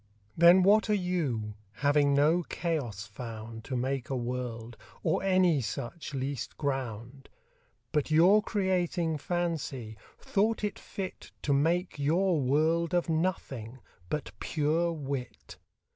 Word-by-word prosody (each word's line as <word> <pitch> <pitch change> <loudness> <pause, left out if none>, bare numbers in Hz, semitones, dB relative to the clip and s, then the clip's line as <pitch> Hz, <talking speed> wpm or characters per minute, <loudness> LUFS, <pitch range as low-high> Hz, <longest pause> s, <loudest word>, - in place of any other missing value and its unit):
Then 175 +3 +7
what 215 +3 +5
are 210 - +4
You, 150 - -1 0.2
having 145 +2 +3
no 155 +5 +4
Chaos 135 - -2
found 115 +1 -8
To 130 - -4
make 130 +1 -2
a 135 - -1
World, 120 -2 -4 0.3
or 160 - +1
any 185 -6 +3
such 140 +6 -5
least 135 0 -4
ground? 135 -2 -4 0.6
But 150 -1 0
your 175 +7 +6
Creating 180 -6 0
Fancy, 145 -9 -3 0.2
thought 215 +2 0
it 205 -2 -2
fit 190 -2 -7
To 145 - +2
make 165 +4 +1
your 165 +3 +2
World 160 +6 +2
of 175 -1 +1
Nothing, 150 -8 -2 0.3
but 150 -7 -3
pure 160 +3 0
Wit. 140 -5 -6
150 Hz, 125 wpm, -29 LUFS, 125-175 Hz, 0.6 s, Then